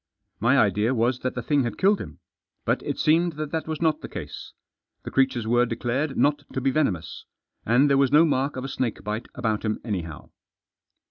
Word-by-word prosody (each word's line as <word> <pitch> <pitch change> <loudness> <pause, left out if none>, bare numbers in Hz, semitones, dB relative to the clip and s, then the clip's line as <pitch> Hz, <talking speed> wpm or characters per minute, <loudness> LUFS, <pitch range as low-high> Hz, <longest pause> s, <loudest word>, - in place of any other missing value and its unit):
My 120 +5 +3
idea 105 +3 +2
was 120 +2 +1
that 130 - -3
the 125 - -4
thing 145 +3 +2
had 120 -3 -4
killed 200 +2 +3
him. - - -9 0.5
But - - +1
it - - -4
seemed 165 +2 +2
that 155 -1 -5
that 160 -1 -3
was 160 +1 -3
not 155 -2 +1
the - - -7
case. - - -8 0.5
The - - -7
creatures 130 -4 +1
were 120 +2 +3
declared 130 +5 -2
not 145 0 +2
to - - -1
be 135 +1 +1
venomous. 120 - -1 0.4
And 125 +6 +4
there 140 -1 +3
was 140 -1 +3
no 155 +3 +6
mark 140 -2 0
of 130 - -4
a - - -3
snake 130 -3 -3
bite 105 +3 -4
about 110 -4 -1
him 110 -1 -1
anyhow. 90 -8 -5
130 Hz, 205 wpm, -25 LUFS, 115-145 Hz, 0.5 s, no